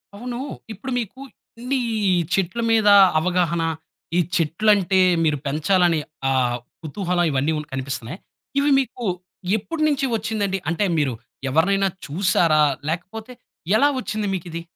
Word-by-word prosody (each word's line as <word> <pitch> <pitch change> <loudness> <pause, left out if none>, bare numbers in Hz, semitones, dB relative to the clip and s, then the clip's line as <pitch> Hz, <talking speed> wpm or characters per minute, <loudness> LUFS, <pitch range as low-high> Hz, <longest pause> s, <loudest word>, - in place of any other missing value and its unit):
అవును. 240 +3 -6 0.3
ఇప్పుడు 240 +6 -7
మీకు 240 +3 -6 0.4
ఎన్ని 255 +3 -1 0.5
చెట్ల 195 +4 0
మీద 220 -2 +4 0.3
అవగాహన, 170 -1 0 0.5
ఈ - - +4 0.2
చెట్లంటే 190 +3 +2 0.2
మీరు 150 -2 +2
పెంచాలని 165 +3 +2 0.3
ఆ - - +2 0.5
కుతహలం 175 +2 -1
ఇవన్నీ 140 +3 +1 0.2
కనిపిస్తున్నాయా, 130 - -5 0.4
ఇవి 285 +1 +2
మీకు 250 -2 -4 0.5
ఎప్పటి 310 +9 -4
నుంచి 285 -2 +1
వచ్చిందండి? 210 -3 -1
అంటే, 175 +5 0
మీరు 145 -4 +1 0.4
ఎవరినైనా 195 +7 +2 0.2
చూసారా? 170 -1 +2 0.3
లేకపోతే 190 +8 -5 0.4
ఎలా 280 +6 +5
వచ్చింది 215 -4 -3
మీకిది? 170 -2 -5
190 Hz, 115 wpm, -22 LUFS, 165-220 Hz, 0.5 s, ఎలా